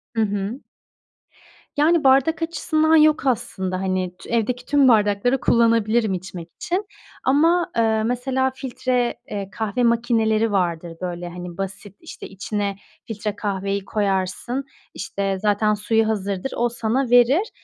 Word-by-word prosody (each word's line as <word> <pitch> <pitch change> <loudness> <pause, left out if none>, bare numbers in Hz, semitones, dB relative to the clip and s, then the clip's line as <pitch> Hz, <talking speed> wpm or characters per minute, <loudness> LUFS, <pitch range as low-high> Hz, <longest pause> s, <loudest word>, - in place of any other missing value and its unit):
Hı 225 - +2
hı. 205 +3 -2 1.2
Yani, 315 +2 +3
bardak 275 +5 +4
açısından 320 -1 +1
yok 305 -1 +4
aslında, 200 -7 -1
hani, 185 -1 -1
t - - -12
evdeki 235 +2 -1
tüm 285 -1 +4
bardakları 215 +2 +3
kullanabilirim 230 -3 +2
içmek 180 -2 -7
için 370 +4 -2 0.4
ama, 330 +6 +3
ııı, 220 -1 +2
mesela, 260 +2 0
filtre, 250 -2 -1 0.2
eee, 200 -2 -4
kahve 220 +3 -2
makineleri 225 -2 +2
vardır, 170 -3 -1
böyle, 175 -1 -4
hani, 175 0 -8
basit, 195 +1 -6
işte, - - -10
içine 200 +1 -3 0.3
filtre 210 -2 -4
kahveyi 200 -1 -2
koyarsın, 200 +5 -1 0.3
işte, 195 0 -3
zaten 210 0 +2
suyu 220 +1 +1
hazırdır, 200 +1 -2
o 240 0 +1
sana 235 +2 -1
verir. 250 - +4
220 Hz, 130 wpm, -22 LUFS, 195-255 Hz, 1.2 s, bardak